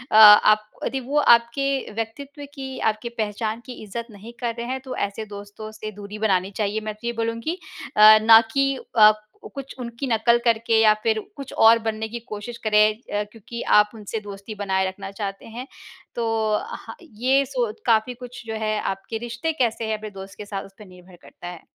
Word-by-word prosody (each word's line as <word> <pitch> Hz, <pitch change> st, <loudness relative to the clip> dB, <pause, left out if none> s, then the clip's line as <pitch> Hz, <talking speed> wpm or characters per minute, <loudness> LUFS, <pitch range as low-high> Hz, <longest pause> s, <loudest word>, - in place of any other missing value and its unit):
आप 215 Hz, 0 st, +8 dB, 0.2 s
यदि 270 Hz, -, -2 dB
वो 275 Hz, +4 st, -3 dB
आपके 265 Hz, +2 st, +3 dB
व्यक्तित्व 280 Hz, +6 st, -6 dB
की, 265 Hz, -2 st, -7 dB
आपकी 220 Hz, +2 st, -1 dB
पहचान 220 Hz, 0 st, -3 dB
की 255 Hz, -, -8 dB
इज़्ज़त 230 Hz, +3 st, -6 dB
नहीं 215 Hz, +3 st, -12 dB
कर 235 Hz, -2 st, -2 dB
रहे 235 Hz, 0 st, -5 dB
हैं, 260 Hz, +1 st, -3 dB
तो 260 Hz, -1 st, -7 dB
ऐसे 200 Hz, +2 st, -3 dB
दोस्तों 205 Hz, +1 st, -9 dB
से 215 Hz, 0 st, -7 dB
दूरी 205 Hz, +1 st, -9 dB
बनानी 195 Hz, -2 st, +1 dB
चाहिए, 210 Hz, 0 st, -1 dB
मैं 215 Hz, 0 st, -4 dB
तो 235 Hz, +2 st, -8 dB
ये 235 Hz, -, -1 dB
बोलूँगी 230 Hz, +10 st, -2 dB, 0.4 s
अ, 215 Hz, +1 st, +10 dB
ना 225 Hz, 0 st, +9 dB
कि 275 Hz, 0 st, +2 dB, 0.2 s
अ, 215 Hz, 0 st, +9 dB, 0.4 s
कुछ 275 Hz, -1 st, -7 dB
उनकी 235 Hz, +2 st, -5 dB
नकल 235 Hz, +1 st, +3 dB
करके 230 Hz, -1 st, +3 dB
या 215 Hz, -1 st, +6 dB
फिर 220 Hz, -1 st, +2 dB, 0.2 s
कुछ 275 Hz, -2 st, -8 dB
और 225 Hz, +1 st, +6 dB
बनने 220 Hz, 0 st, -3 dB
की 235 Hz, +1 st, -5 dB
कोशिश 215 Hz, +3 st, -6 dB
करें 215 Hz, 0 st, +4 dB, 0.3 s
अ, -, -, -1 dB
क्योंकि 235 Hz, +1 st, -8 dB, 0.2 s
आप 210 Hz, -, +3 dB
उनसे 215 Hz, +1 st, -5 dB
दोस्ती 205 Hz, +1 st, -9 dB
बनाए 190 Hz, -2 st, 0 dB
रखना 195 Hz, +1 st, -7 dB
चाहते 195 Hz, -1 st, -6 dB
हैं। 245 Hz, +4 st, -8 dB, 0.5 s
तो 235 Hz, -1 st, -1 dB, 0.5 s
ह -, -, -9 dB
ये 265 Hz, -1 st, +1 dB
सोच 245 Hz, -5 st, -3 dB
काफ़ी 230 Hz, +1 st, +2 dB
कुछ 245 Hz, 0 st, -10 dB
जो 220 Hz, -, -5 dB
है 215 Hz, 0 st, 0 dB
आपके 195 Hz, +4 st, -4 dB
रिश्ते 240 Hz, +8 st, -2 dB
कैसे 235 Hz, -5 st, -1 dB
हैं 215 Hz, -1 st, -1 dB
अपने 215 Hz, 0 st, -8 dB
दोस्त 195 Hz, 0 st, -11 dB
के 210 Hz, -, -8 dB
साथ, 200 Hz, -1 st, -5 dB
उसपे 195 Hz, +2 st, -14 dB
निर्भर 180 Hz, 0 st, -16 dB
करता 175 Hz, -, -12 dB
है। 175 Hz, -2 st, -8 dB
220 Hz, 195 wpm, -23 LUFS, 210-240 Hz, 0.5 s, अ